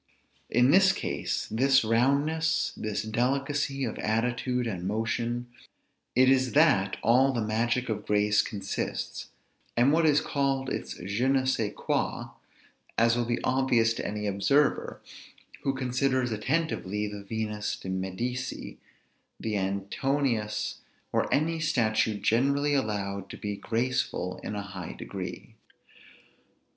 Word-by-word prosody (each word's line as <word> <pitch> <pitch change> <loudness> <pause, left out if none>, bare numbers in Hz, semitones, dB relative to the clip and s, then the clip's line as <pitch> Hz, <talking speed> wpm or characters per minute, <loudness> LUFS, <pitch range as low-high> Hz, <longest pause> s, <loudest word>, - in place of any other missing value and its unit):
In 125 +3 +4
this 190 +2 +6
case, - - -2
this 135 +4 +4
roundness, 145 +8 +2
this 105 -1 -3
delicacy 135 +5 0
of 115 - -5
attitude 125 +3 0
and 95 -5 -3
motion, 115 +3 -1 0.7
it 130 +1 +6
is 130 -1 +3
that 100 -11 +4
all 130 +4 +5
the 120 -4 -1
magic 120 +4 0
of 105 -2 -3
grace 105 0 +3
consists, 100 -2 -4 0.5
and 125 +5 +5
what 165 0 +4
is 150 -1 +5
called 135 -1 -1
its - - -4
je 100 +8 -1
ne 135 0 +3
sçai 115 -5 0
quoi; - - -2 0.7
as 115 +1 +4
will 120 0 0
be 120 0 0
obvious 125 -4 +3
to - - -5
any 105 0 -3
observer, 120 +9 +1 0.6
who 135 -1 0
considers 130 -1 0
attentively 105 - -1
the 105 -1 -6
Venus 105 0 -3
de - - -10
Medicis, 115 +8 -4 0.6
the 110 -1 -2
Antinous 105 +4 -1 0.3
or - - 0
any 160 +3 +1
statue 110 -7 +1
generally 140 +7 +2
allowed 100 -6 -2
to - - -8
be 105 0 -4
graceful 115 -5 -1
in 105 - -4
a 100 - -3
high 95 -8 -7
degree. - - -7
120 Hz, 130 wpm, -28 LUFS, 105-135 Hz, 0.7 s, this